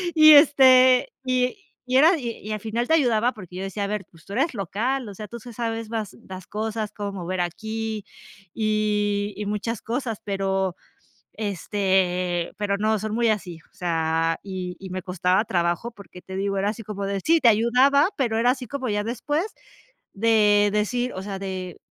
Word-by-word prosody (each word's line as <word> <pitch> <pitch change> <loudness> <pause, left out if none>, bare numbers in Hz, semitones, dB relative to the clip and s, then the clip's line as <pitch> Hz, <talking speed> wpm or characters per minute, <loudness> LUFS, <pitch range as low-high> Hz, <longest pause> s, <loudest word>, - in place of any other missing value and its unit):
Y 310 -1 +9
este, 260 -3 +6
y 255 +4 +1 0.3
y 255 0 +2
era 325 +6 +6
y 230 -5 -6
al 215 - -3
final 230 +3 -2
te - - +2
ayudaba 245 -4 +2
porque 185 -4 -10
yo 190 - -4
decía: 200 +1 -4
"A - - -3
ver, 205 -2 -3
pues 165 -1 -20
tú - - -13
eres 275 +5 +1
local, 230 +5 -2
o - - -8
sea, 210 +1 -7
tú 235 - -8
te 240 +2 -11
sabes 225 -1 -3
más 220 -3 -4
las 185 -1 -9
cosas, 215 0 -3
cómo 205 -1 -4
mover 185 0 -3
aquí, 220 +4 -4 0.5
y 210 -1 0
y 210 - -4
muchas 210 +2 -3
cosas". 230 -2 -3
Pero, 195 -2 -1 0.6
este, 185 -3 0
pero 200 -1 0
no, 215 +1 +1
son 215 +1 -4
muy 235 0 +2
así, 185 -6 -3
o - - -36
sea, 165 -1 0
y 185 -2 -5
y 190 -1 -8
me 185 -1 -4
costaba 185 +2 +1
trabajo, 175 +5 -1
porque 200 -4 -13
te 190 - -8
digo, 195 0 -1
era 200 +2 +1
así 225 +1 -7
como 200 -1 -5
de 195 0 -2
sí, 330 - +3
te 240 - +6
ayudaba, 250 - +4
pero 235 -5 0
era 245 +2 +4
así 255 -1 -3
como 260 -1 -4
ya 205 0 0
después 290 - -1 0.7
de 210 -1 +4
decir, 245 +4 0
o 185 - -5
sea, 195 -1 -5
de, 185 -2 -5
210 Hz, 190 wpm, -24 LUFS, 190-235 Hz, 0.7 s, Y